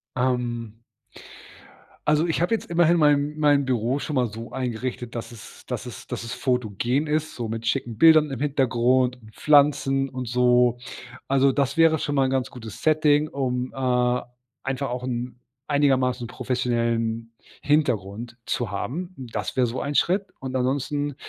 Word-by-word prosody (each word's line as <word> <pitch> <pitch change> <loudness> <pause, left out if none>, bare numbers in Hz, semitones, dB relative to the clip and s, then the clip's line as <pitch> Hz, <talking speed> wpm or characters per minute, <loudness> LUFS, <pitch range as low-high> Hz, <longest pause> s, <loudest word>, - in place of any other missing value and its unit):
Ähm. 120 -3 -1 1.3
Also 150 +2 +3
ich 165 - -1
habe 175 - 0
jetzt 225 - -1
immerhin 170 0 +3
mein 150 -1 +3
mein 145 -2 +4
Büro 125 +1 0
schon 150 - -4
mal 125 -1 +3
so 115 +2 -8
eingerichtet, 125 -1 -4
dass 115 +1 -5
es 115 -3 -13
dass - - -4
es - - -9
dass - - -5
es 115 - -6
fotogen 125 +2 -1
ist, 155 +1 -1
so 120 - -3
mit 115 +1 -4
schicken 120 -1 -1
Bildern 155 +2 +6
im 130 - -5
Hintergrund 125 -3 +1
und 110 0 -16
Pflanzen 140 -2 +3
und 130 -2 -6
so, 125 0 +3 0.5
also 135 0 +4
das 140 +1 0
wäre 165 -2 +4
schon 145 - -2
mal 135 - +4
'n - - -1
ganz 130 -3 -1
gutes 110 -5 -10
Setting, 155 -1 +3
um, 125 -3 -2
äh, 125 -1 +1 0.4
einfach 135 0 -2
auch 125 0 -4
'n 125 -1 -4 0.3
einigermaßen 130 -4 +2
professionellen 115 -2 -1 0.3
Hintergrund 120 -6 0
zu 115 -5 -2
haben. 175 - -4
Das 125 -3 -5
wäre 125 - +3
so 120 +3 -4
ein 145 +1 -3
Schritt 190 +6 +2
und 130 -1 -4
ansonsten, 145 +3 -1
130 Hz, 160 wpm, -24 LUFS, 120-145 Hz, 1.3 s, Bildern